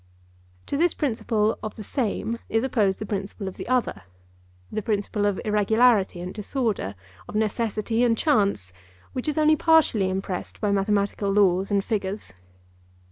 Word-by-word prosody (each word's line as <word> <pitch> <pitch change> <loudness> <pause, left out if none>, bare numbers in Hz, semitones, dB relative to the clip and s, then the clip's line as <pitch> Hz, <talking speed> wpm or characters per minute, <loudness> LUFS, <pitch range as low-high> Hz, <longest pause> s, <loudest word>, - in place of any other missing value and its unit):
To 280 - -2
this 345 +2 +2
principle 220 -5 0
of 215 - -5
the 215 - -8
same 230 0 -2
is 225 +1 +1
opposed 210 -7 +1
the 215 - -5
principle 200 0 -4
of 190 - -7
the - - -7
other—the 90 - -4
principle 205 0 -1
of 200 -2 -1
irregularity 210 -2 +3
and 180 +1 -6
disorder, 210 - -2 0.3
of - - -7
necessity 220 +1 0
and 230 -2 +3
chance, 200 - +1 0.4
which 255 - -4
is 300 - -1
only 310 0 +5
partially 305 - +3
impressed 190 -1 -4
by 205 -2 0
mathematical 200 0 0
laws 195 -2 +3
and 200 -1 +1
figures. 200 - -3
210 Hz, 145 wpm, -25 LUFS, 195-230 Hz, 0.4 s, only